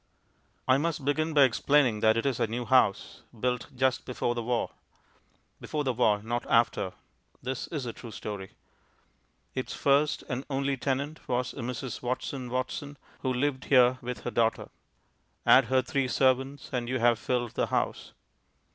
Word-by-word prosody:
I 130 +1 +5
must 160 -2 -2
begin 155 +2 0
by 145 - +8
explaining 130 -2 +3
that 110 +1 +4
it 115 - -1
is 135 -4 0
a - - +2
new 120 +2 -3
house, 115 -5 +2 0.2
built 125 +1 -1
just 130 0 +1
before 120 -1 -1
the 120 - -3
war. 120 0 -1 0.9
(Before 150 -1 -3
the 130 -2 0
war, 105 -4 +2
not 120 +2 -2
after; 115 -5 +2 0.5
this 130 0 -3
is 145 -6 -4
a 120 - -4
true 120 - -10
story.) 100 -3 -7 1.0
Its 130 - -4
first 145 +1 +2
and 130 -1 -3
only 140 0 0
tenant 140 +4 -2
was 125 0 -1
a - - -14
Mrs. 125 0 -4
Watson 125 +1 -3
Watson, 130 +3 -3 0.2
who 130 - -1
lived 130 +1 -1
here 130 -1 +5
with 125 0 -5
her 120 - -4
daughter. 115 -1 0 0.7
Add 130 - +7
her 130 +2 +2
three 135 +1 0
servants, 130 +2 +1
and 120 -1 -2
you 130 - 0
have 120 -2 +3
filled 120 -2 -1
the - - -1
house. - - -2
125 Hz, 165 wpm, -28 LUFS, 120-135 Hz, 1.0 s, by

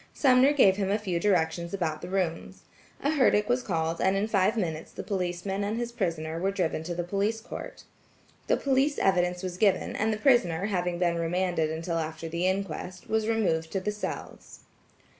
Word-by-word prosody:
Sumner 260 0 +5
gave 200 -10 +5
him 195 -2 -1
a 205 - +2
few 190 -5 -2
directions 170 -2 +1
about 160 -5 -2
the - - -7
rooms. 180 -4 -2 0.4
A 285 - +2
herdic 245 -8 +3
was 245 +1 +2
called, 165 -5 -2
and 190 +1 +3
in 200 +2 0
five 210 +1 +2
minutes 160 -6 -3
the - - -7
policeman 190 +1 -2
and 210 +2 -2
his 240 0 -3
prisoner 165 -7 -2
were 190 +3 +1
driven 180 -5 -1
to 175 0 -3
the 175 - -2
Police 200 +5 -1
Court. 225 - -8 0.6
The - - +3
police 275 +2 +1
evidence 180 -1 +1
was 180 -1 -4
given, 200 -1 +2
and 220 +1 +1
the 215 - -1
prisoner 205 - +3
having 180 -4 -1
been 170 -1 +1
remanded 170 -1 0
until 165 +1 -2
after 160 +1 -4
the 170 +3 -1
inquest, 185 -1 -3
was 220 0 +1
removed 165 -8 +1
to 195 - +1
the 210 +3 -2
cells. 210 0 -7
185 Hz, 190 wpm, -28 LUFS, 170-210 Hz, 0.6 s, Sumner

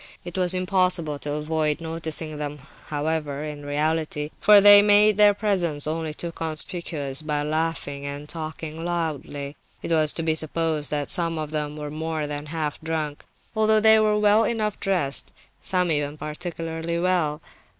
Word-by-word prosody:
It 175 - -8
was 185 -1 +3
impossible 180 -5 +1
to 145 0 -3
avoid 150 0 -1
noticing 160 -1 -2
them, 150 0 -4 0.3
however, 150 -1 -2
in 150 -1 -7
reality, 150 +1 -1
for 210 -1 +7
they 205 0 +9
made 210 0 +5
their 205 -1 +6
presence 175 -9 0
only 160 0 -3
too 170 +3 -4
conspicuous 155 -3 -3
by 150 -1 -1
laughing 150 -2 -2
and 145 +1 -6
talking 160 0 -6
loudly. 155 -4 -4 0.3
It - - -4
was 155 -2 +3
to 165 - -3
be 160 -1 +2
supposed 155 -1 -1
that 145 -2 -1
some 165 -3 +1
of 155 -1 -4
them 150 -1 -3
were 150 -1 -6
more 160 0 -3
than 145 0 -5
half 155 -1 -4
drunk, 155 -2 -4 0.3
although 220 0 +3
they 220 0 +6
were 215 -1 +2
well 210 +1 +4
enough 215 -2 -1
dressed, 175 -8 0 0.3
some 180 -2 +1
even 145 -1 -1
particularly 165 +1 -4
well. 170 -4 0
160 Hz, 160 wpm, -24 LUFS, 150-175 Hz, 0.3 s, they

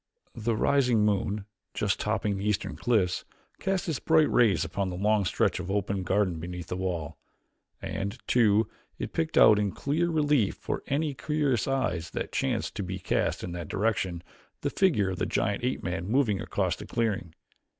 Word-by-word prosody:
The 115 -1 -1
rising 125 -3 +3
moon, 100 0 0 0.3
just - - 0
topping 105 -2 0
the 100 +2 -1
eastern 95 -5 -1
cliffs, 95 -2 +1 0.4
cast 195 -2 -1
its 155 -6 -1
bright 160 -2 +3
rays 100 -10 +4
upon 95 +4 -2
the 90 - -4
long 105 +2 +2
stretch 90 - +1
of 90 0 -5
open 100 -1 -1
garden 95 -2 +1
beneath 85 0 -6
the - - -2
wall. 85 -5 -3 0.6
And, 95 +3 -3
too, 110 -3 +4 0.3
it - - -5
picked 160 -1 -1
out 105 -1 +8
in 100 -2 0
clear 160 - 0
relief 150 - +2
for - - -4
any 145 +1 0
curious 140 -7 0
eyes 90 -11 -1
that - - -3
chanced - - -1
to - - -2
be 95 +1 -4
cast 90 - -1
in 90 - -4
that 85 -2 -5
direction, 95 -5 -1 0.4
the - - -1
figure 110 - +2
of 90 - -5
the - - 0
giant 100 +3 0
ape 130 +1 -1
man 90 0 -3
moving 110 -4 +2
across - - -1
the - - -10
clearing. 105 -8 -1
105 Hz, 180 wpm, -28 LUFS, 90-125 Hz, 0.6 s, out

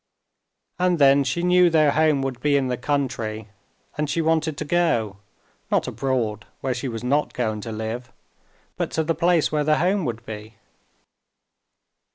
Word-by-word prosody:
And 180 -1 +2
then 140 -1 +5
she 170 +6 -2
knew 180 0 +5
their 155 -3 +4
home 155 -3 +2
would 130 -2 -3
be 145 +1 +2
in 130 -2 0
the 125 - 0
country, 120 -5 -2 0.5
and 150 -1 0
she 155 - -1
wanted 160 -2 +1
to - - -4
go, 145 - +1 0.5
not - - +1
abroad 120 -6 -2 0.2
where 130 -1 -1
she 125 +2 -4
was 115 -2 -5
not 140 +4 0
going 110 -3 -2
to 115 - -6
live, 110 +3 -5 0.7
but - - -1
to 160 - +1
the 165 +1 0
place 170 0 +2
where 150 -1 +1
their 155 +1 +3
home 185 +3 +1
would 115 -2 -4
be. 110 0 -8
140 Hz, 170 wpm, -23 LUFS, 115-160 Hz, 0.7 s, then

